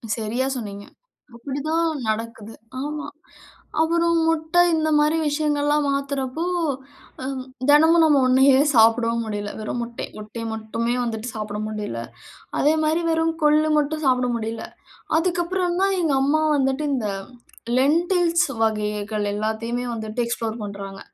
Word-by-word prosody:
சரியா 230 +3 -2
சொன்னீங்க, 205 -4 -6 0.5
அப்படிதான் 290 +7 -1 0.2
நடக்குது 225 0 -4 0.3
ஆமா, 295 +1 -4 0.7
அப்புறம் 335 +1 +2
முட்ட 320 0 -1 0.2
இந்த 315 -1 +1
மாரி 300 +2 +3
விஷயங்கள்லாம் 295 0 +1
மாத்துறப்போ, 275 +1 -2 0.8
ம் 265 -1 -4 0.3
தெனமும் 320 +3 +6
நம்ம 295 -3 +4
ஒண்ணையே 265 +1 +5
சாப்டவும் 230 0 +4
முடியல. 205 -1 -4
வெறும் 220 +3 -3
முட்டை 235 0 -6
முட்டை 215 +2 -7
மட்டுமே 225 +2 -2
வந்துட்டு 230 -1 -4
சாப்ட 210 -1 -4
முடியல. 210 - -4 0.6
அதேமாரி 315 +2 +2
வெறும் 325 0 +1
கொள்ளு 300 +1 +4
மட்டும் 305 +1 -1
சாப்பட 250 -1 +2
முடியல. 225 0 -4 0.5
அதுக்கப்புறம் 350 +1 0
தான் 390 0 +3
எங்க 325 -4 +1
அம்மா 300 +3 +2
வந்துட்டு 270 +1 0
இந்த 230 -5 -1 0.7
லெண்டில்ஸ் 340 +4 +3 0.2
வகைகள 210 -1 -1
எல்லாத்தையுமே 220 +3 -2
வந்துட்டு 220 +1 -4
எக்ஸ்ப்ளோர் 230 -1 -3
பண்றாங்க. 200 -1 -7
265 Hz, 120 wpm, -23 LUFS, 220-310 Hz, 0.8 s, தெனமும்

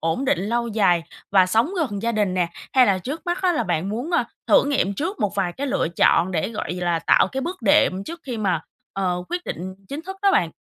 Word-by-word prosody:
ổn 165 +11 -1
định 280 +1 +2
lâu 235 +4 -1
dài 195 -6 +2 0.3
và 190 -2 +5
sống 225 - +2
gần 215 - -2
gia 235 0 0
đình 205 -4 0
nè? 180 -2 +1 0.2
Hay 255 -2 +6
là 195 -3 +2
trước 280 - -6
mắt 350 +2 -2
á 365 -1 +3
là 310 - 0
bạn 175 +1 -1
muốn, 240 +10 -3
a, 345 - +2 0.2
thử - - +5
nghiệm 275 -9 0
trước 345 - -3
một 205 -1 0
vài 190 -3 0
cái 280 +9 -4
lựa 255 - 0
chọn 175 +3 +4
để, 160 -3 0
gọi 220 -5 -4
là, 175 -2 -1
tạo 165 - +3
cái 265 - -2
bước 340 -1 -5
đệm 195 -2 +3
trước 335 +1 -8
khi 245 -4 -4
mà, 190 -6 0 0.3
ờ, 180 -2 -1
quyết 355 0 -3
định 185 +2 -5
chính 290 +3 -5
thức 380 +3 -7
đó 400 - +5
bạn? 170 - +2
210 Hz, 250 wpm, -22 LUFS, 185-280 Hz, 0.3 s, Hay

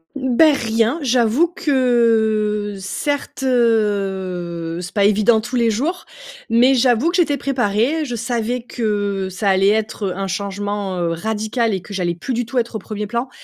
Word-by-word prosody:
Bah 280 +3 +4
rien, 225 +3 0
j'avoue 250 +4 +3
que 220 -7 +1
certes, 275 +8 -3
heu, 190 -8 0
c'est 175 - -7
pas 200 -2 +2
évident 215 +2 +4
tous 240 +4 -5
les 235 -1 +3
jours, 295 - -2 0.4
mais 245 +4 +4
j'avoue 255 +4 +3
que - - -3
j'étais 305 -5 +2
préparée, 255 +4 0
je 245 - -4
savais 235 +1 -2
que 205 -5 -2
ça 195 +2 -1
allait 190 0 +3
être, 215 -1 -1
heu, 180 -1 -4
un 195 - -2
changement, 200 0 -3
heu, 170 -1 -1
radical 220 +4 -1
et 185 - -4
que 205 - -11
j'allais 175 -3 -1
plus 215 +10 -4
du 240 0 -1
tout 260 - -5
être 235 -1 -1
au - - -2
premier 210 +1 -5
plan 235 +5 -3
220 Hz, 170 wpm, -19 LUFS, 200-245 Hz, 0.4 s, Bah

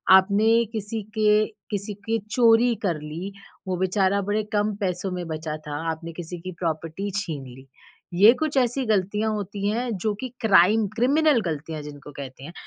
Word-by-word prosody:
आपने 215 +5 +4
किसी 220 +1 -3 0.2
के 215 0 +4 0.3
किसी 205 +1 -3
के 225 0 +1
चोरी 235 0 +5
कर 175 -6 0
ली, 160 +6 -6 0.4
वो 185 -1 -1
बेचारा 190 +2 +2
बड़े 205 +2 0
कम 210 0 +1
पैसों 185 0 -1
में 180 -1 -4
बचा 155 -1 -4
था, 150 -1 -7 0.2
आपने 165 +1 -6
किसी 175 +1 -7
की 185 +2 -6
प्रॉपर्टी 165 +3 -3
छीन 155 -9 -4
ली। 130 +2 -13 0.6
ये 225 +3 +10
कुछ 310 -3 -1
ऐसी 255 +1 +1
गलतियाँ 210 +1 +1
होती 200 -1 -3
हैं 240 +3 -1
जो 210 +4 -1
कि 255 - -4
क्राइम 215 0 +5
क्रिमिनल 280 +2 +3
गलतियाँ 155 0 -4
जिनको 145 0 -10
कहते 135 -1 -9
हैं, 170 - -9
200 Hz, 170 wpm, -24 LUFS, 165-220 Hz, 0.6 s, ये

